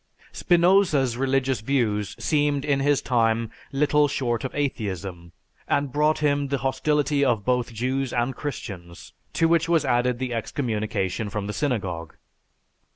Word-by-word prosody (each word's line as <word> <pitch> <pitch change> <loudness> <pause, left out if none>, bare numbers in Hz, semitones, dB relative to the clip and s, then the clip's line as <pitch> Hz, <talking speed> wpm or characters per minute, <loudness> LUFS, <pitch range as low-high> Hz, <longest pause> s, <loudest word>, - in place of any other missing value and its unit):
Spinoza's 175 -8 +3
religious 135 -1 0
views 110 -5 0
seemed 145 -2 +1
in 140 -2 +1
his 140 0 +2
time 115 -2 +1 0.2
little 150 +1 +3
short 120 -4 -1
of 130 - -5
atheism 95 -11 -3 0.4
and 140 -2 0
brought 150 +3 +2
him 145 -1 +1
the 140 0 -1
hostility 145 +1 +1
of 120 -6 +1
both 125 -1 0
Jews 130 +3 -2
and 120 +2 -1
Christians, 90 - -7 0.2
to 165 - +3
which 165 0 +2
was 165 -4 +3
added 125 -1 +1
the 125 -1 -3
excommunication 110 -4 -2
from 105 -1 -4
the 105 - -4
synagogue. 95 - -2
130 Hz, 140 wpm, -24 LUFS, 110-145 Hz, 0.4 s, Spinoza's